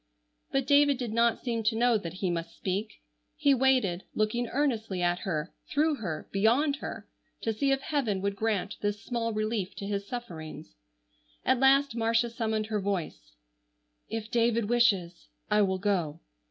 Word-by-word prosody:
But 270 Hz, -1 st, +1 dB
David 285 Hz, -1 st, +5 dB
did 240 Hz, -4 st, -4 dB
not 230 Hz, 0 st, +3 dB
seem 235 Hz, -3 st, -1 dB
to 220 Hz, +1 st, +2 dB
know 240 Hz, +1 st, +3 dB
that 170 Hz, -6 st, -3 dB
he 180 Hz, -, +2 dB
must 170 Hz, 0 st, -4 dB
speak. 195 Hz, -, -3 dB, 0.3 s
He 285 Hz, -2 st, +4 dB
waited, 250 Hz, -9 st, +2 dB
looking 225 Hz, +3 st, 0 dB
earnestly 225 Hz, -9 st, -1 dB
at 175 Hz, 0 st, +1 dB
her, 165 Hz, -3 st, -3 dB, 0.2 s
through 300 Hz, 0 st, +2 dB
her, 160 Hz, -9 st, -5 dB
beyond 245 Hz, +9 st, +3 dB
her, -, -, -7 dB, 0.3 s
to 225 Hz, -, 0 dB
see 275 Hz, +5 st, +1 dB
if 270 Hz, 0 st, +1 dB
Heaven 265 Hz, -10 st, 0 dB
would 200 Hz, 0 st, -1 dB
grant 210 Hz, -1 st, -1 dB
this 205 Hz, 0 st, -1 dB
small 230 Hz, -2 st, -2 dB
relief 215 Hz, -3 st, -2 dB
to 200 Hz, -, -6 dB
his 200 Hz, 0 st, -3 dB
sufferings. 170 Hz, -, -7 dB, 0.7 s
At 260 Hz, -, +3 dB
last 270 Hz, -1 st, +4 dB
Marcia 230 Hz, +1 st, +1 dB
summoned 220 Hz, -2 st, -1 dB
her 215 Hz, -1 st, -2 dB
voice: 160 Hz, -, -4 dB, 0.7 s
"If 225 Hz, -1 st, -4 dB
David 230 Hz, -2 st, +2 dB
wishes 200 Hz, -8 st, +2 dB, 0.2 s
I 210 Hz, 0 st, +5 dB
will 190 Hz, -2 st, +2 dB
go." 185 Hz, -6 st, -1 dB
220 Hz, 165 wpm, -29 LUFS, 195-245 Hz, 0.7 s, David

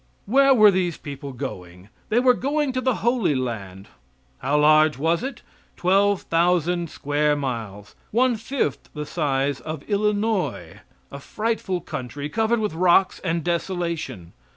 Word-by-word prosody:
Where 275 Hz, +5 st, +4 dB
were 215 Hz, -3 st, +7 dB
these 180 Hz, -3 st, -1 dB
people 140 Hz, -1 st, -8 dB
going? 90 Hz, -5 st, -8 dB, 0.2 s
They 230 Hz, -, +3 dB
were 250 Hz, 0 st, +5 dB
going 285 Hz, +2 st, -1 dB
to 255 Hz, -, -1 dB
the 255 Hz, -2 st, +1 dB
Holy 235 Hz, -, +2 dB
Land. 100 Hz, -7 st, -5 dB, 0.5 s
How 140 Hz, +3 st, 0 dB
large 155 Hz, 0 st, +5 dB
was 165 Hz, +5 st, +1 dB
it? 270 Hz, +2 st, -6 dB, 0.3 s
Twelve 195 Hz, +2 st, +2 dB
thousand 175 Hz, 0 st, +1 dB
square 145 Hz, +1 st, 0 dB
miles 115 Hz, -7 st, -5 dB, 0.2 s
one 245 Hz, +2 st, +2 dB
fifth 225 Hz, -, -3 dB
the 150 Hz, 0 st, -4 dB
size 140 Hz, -3 st, -1 dB
of 155 Hz, +3 st, -6 dB
Illinois 210 Hz, -1 st, -1 dB, 0.3 s
a -, -, -7 dB
frightful 210 Hz, -5 st, -2 dB
country, 140 Hz, 0 st, -6 dB
covered 225 Hz, +5 st, +1 dB
with 210 Hz, -6 st, -2 dB
rocks 180 Hz, +2 st, +3 dB
and 170 Hz, -3 st, -1 dB
desolation. 170 Hz, -, -3 dB
170 Hz, 140 wpm, -23 LUFS, 140-210 Hz, 0.5 s, were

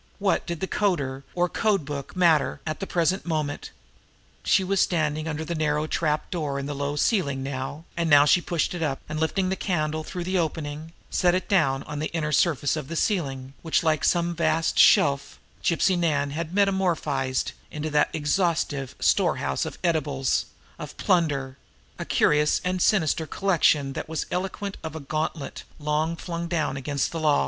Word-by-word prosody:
What 200 Hz, -1 st, 0 dB
did 170 Hz, +1 st, -4 dB
a -, -, 0 dB
coder 140 Hz, -12 st, 0 dB
or 175 Hz, 0 st, +2 dB
code 200 Hz, -4 st, 0 dB
book, 140 Hz, +1 st, -6 dB
matter 170 Hz, -5 st, +3 dB
at 155 Hz, -1 st, -3 dB
the 195 Hz, -, -4 dB
present 175 Hz, +3 st, +1 dB
moment? 155 Hz, -4 st, -2 dB, 0.7 s
She 190 Hz, -, +3 dB
was 195 Hz, 0 st, +1 dB
standing 155 Hz, -2 st, 0 dB
under 160 Hz, 0 st, -3 dB
the 170 Hz, -, -3 dB
narrow 150 Hz, -1 st, 0 dB
trap 155 Hz, -1 st, -1 dB
door 150 Hz, -6 st, -2 dB
in 140 Hz, -, -3 dB
the 145 Hz, -, -3 dB
low 140 Hz, +1 st, -2 dB
ceiling 145 Hz, -, +1 dB
now, 135 Hz, +3 st, -5 dB
and 170 Hz, -1 st, 0 dB
now 145 Hz, -1 st, +7 dB
she 150 Hz, +4 st, +4 dB
pushed 170 Hz, -1 st, -1 dB
it 175 Hz, -, -5 dB
up, 140 Hz, -4 st, -1 dB
and 155 Hz, 0 st, -4 dB
lifting 185 Hz, +4 st, 0 dB
the 190 Hz, -, 0 dB
candle 155 Hz, -5 st, -1 dB
through 180 Hz, +2 st, -5 dB
the 185 Hz, +1 st, 0 dB
opening, 155 Hz, 0 st, -3 dB, 0.2 s
set 175 Hz, 0 st, +3 dB
it 185 Hz, -, -2 dB
down 135 Hz, -9 st, +2 dB
on 150 Hz, -1 st, -6 dB
the 155 Hz, -, -2 dB
inner 155 Hz, -2 st, -1 dB
surface 145 Hz, -2 st, +2 dB
of 150 Hz, -4 st, -5 dB
the 165 Hz, -, -5 dB
ceiling, 135 Hz, -, -1 dB
which, 160 Hz, 0 st, +1 dB
like 155 Hz, -2 st, +1 dB
some 170 Hz, 0 st, +2 dB
vast 160 Hz, 0 st, +1 dB
shelf, 140 Hz, -1 st, +4 dB, 0.3 s
Gypsy 180 Hz, +2 st, +2 dB
Nan 150 Hz, -5 st, +1 dB
had 165 Hz, +2 st, -4 dB
metamorphosed 175 Hz, -9 st, +1 dB, 0.2 s
into 155 Hz, +1 st, -4 dB
that 150 Hz, 0 st, +3 dB
exhaustive 155 Hz, -3 st, 0 dB
storehouse 70 Hz, -1 st, +1 dB
of -, -, -6 dB
edibles, 145 Hz, -6 st, +1 dB, 0.3 s
of -, -, -8 dB
plunder 140 Hz, -6 st, +1 dB, 0.4 s
a -, -, -3 dB
curious 150 Hz, 0 st, +3 dB
and 180 Hz, 0 st, -1 dB
sinister 160 Hz, -6 st, +2 dB
collection 155 Hz, -8 st, +2 dB
that -, -, -5 dB
was 160 Hz, -1 st, -2 dB
eloquent 195 Hz, +2 st, -3 dB
of 160 Hz, -1 st, -5 dB
a -, -, -4 dB
gauntlet 155 Hz, +1 st, -4 dB
long 155 Hz, +2 st, 0 dB
flung 170 Hz, 0 st, -5 dB
down 160 Hz, -5 st, -1 dB
against 140 Hz, +1 st, -2 dB
the 165 Hz, -, -4 dB
law. 155 Hz, -2 st, +3 dB
155 Hz, 180 wpm, -25 LUFS, 145-175 Hz, 0.7 s, now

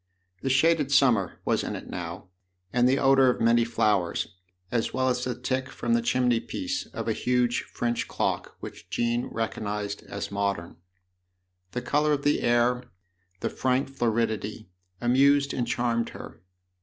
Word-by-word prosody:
The 135 Hz, -, -1 dB
shaded 145 Hz, +2 st, +3 dB
summer 120 Hz, -10 st, +3 dB
was -, -, +1 dB
in -, -, -3 dB
it -, -, -8 dB
now, -, -, -6 dB, 0.4 s
and 125 Hz, +1 st, +4 dB
the 135 Hz, -, +3 dB
odour 135 Hz, -1 st, +5 dB
of 125 Hz, -, 0 dB
many 115 Hz, +1 st, +4 dB
flowers, 105 Hz, -6 st, +1 dB, 0.4 s
as 115 Hz, -2 st, -1 dB
well 130 Hz, 0 st, +2 dB
as 125 Hz, 0 st, 0 dB
the 125 Hz, -1 st, -3 dB
tick 130 Hz, 0 st, -2 dB
from 235 Hz, -, -2 dB
the 235 Hz, -, +3 dB
chimney 125 Hz, -, +2 dB
piece 280 Hz, -, -4 dB
of -, -, -6 dB
a 110 Hz, -, +2 dB
huge 125 Hz, +1 st, +1 dB
French 120 Hz, 0 st, -2 dB
clock -, -, -2 dB
which -, -, -9 dB
Jean 120 Hz, +1 st, 0 dB
recognised 105 Hz, -2 st, -3 dB
as 100 Hz, 0 st, -5 dB
modern. 100 Hz, -5 st, -2 dB, 1.0 s
The 125 Hz, -, -3 dB
colour 150 Hz, +3 st, +2 dB
of 140 Hz, -1 st, -1 dB
the 145 Hz, -, +2 dB
air, 120 Hz, +1 st, +2 dB, 0.6 s
the -, -, 0 dB
frank 130 Hz, +1 st, 0 dB
floridity, 110 Hz, -4 st, -1 dB, 0.3 s
amused 140 Hz, +3 st, +3 dB
and 120 Hz, -2 st, -1 dB
charmed 115 Hz, -1 st, 0 dB
her. -, -, -10 dB
125 Hz, 155 wpm, -27 LUFS, 115-135 Hz, 1.0 s, odour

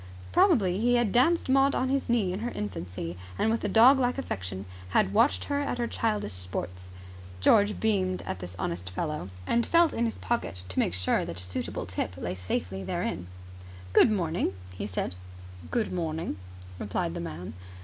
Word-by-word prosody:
Probably 200 Hz, -, +4 dB
he 245 Hz, +2 st, +3 dB
had 240 Hz, -4 st, +2 dB
danced 325 Hz, -, +3 dB
Maud 270 Hz, +1 st, +4 dB
on 260 Hz, -, +1 dB
his 275 Hz, -1 st, 0 dB
knee 215 Hz, -7 st, +2 dB
in 190 Hz, -, -3 dB
her 235 Hz, +2 st, -2 dB
infancy, 90 Hz, -, -5 dB, 0.2 s
and 220 Hz, -, +2 dB
with 230 Hz, -, -1 dB
a -, -, +1 dB
dog 255 Hz, +5 st, +7 dB
like 250 Hz, 0 st, +1 dB
affection 95 Hz, -, -4 dB, 0.2 s
had 195 Hz, -, +2 dB
watched 230 Hz, +7 st, +3 dB
her 285 Hz, -1 st, -1 dB
at 285 Hz, -3 st, -1 dB
her 240 Hz, -, 0 dB
childish 215 Hz, -, -1 dB
sports. 90 Hz, 0 st, -5 dB, 0.5 s
George 205 Hz, -, +4 dB
beamed 190 Hz, -4 st, +1 dB
at 95 Hz, -, -4 dB
the 90 Hz, -1 st, -6 dB
honest 90 Hz, +1 st, -3 dB
fellow, 150 Hz, -, -3 dB, 0.2 s
and 235 Hz, -, +2 dB
felt 335 Hz, +3 st, +4 dB
in 235 Hz, -, +1 dB
his 225 Hz, -, -2 dB
pocket 165 Hz, -, -2 dB
to 95 Hz, -, -2 dB
make 90 Hz, -, +1 dB
sure 90 Hz, -1 st, +1 dB
that 85 Hz, +1 st, -5 dB
a -, -, -4 dB
suitable 90 Hz, 0 st, -3 dB
tip 90 Hz, 0 st, -3 dB
lay 90 Hz, 0 st, -3 dB
safely 90 Hz, +1 st, -3 dB
therein. 90 Hz, -1 st, -2 dB, 0.7 s
"Good -, -, +7 dB
morning," 170 Hz, -, 0 dB, 0.2 s
he 90 Hz, +3 st, -5 dB
said. 90 Hz, -2 st, -2 dB, 0.6 s
"Good 230 Hz, -5 st, 0 dB
morning," 160 Hz, -, -2 dB, 0.4 s
replied 95 Hz, -4 st, -2 dB
the -, -, -4 dB
man. 85 Hz, +1 st, -6 dB
180 Hz, 180 wpm, -28 LUFS, -, 0.7 s, dog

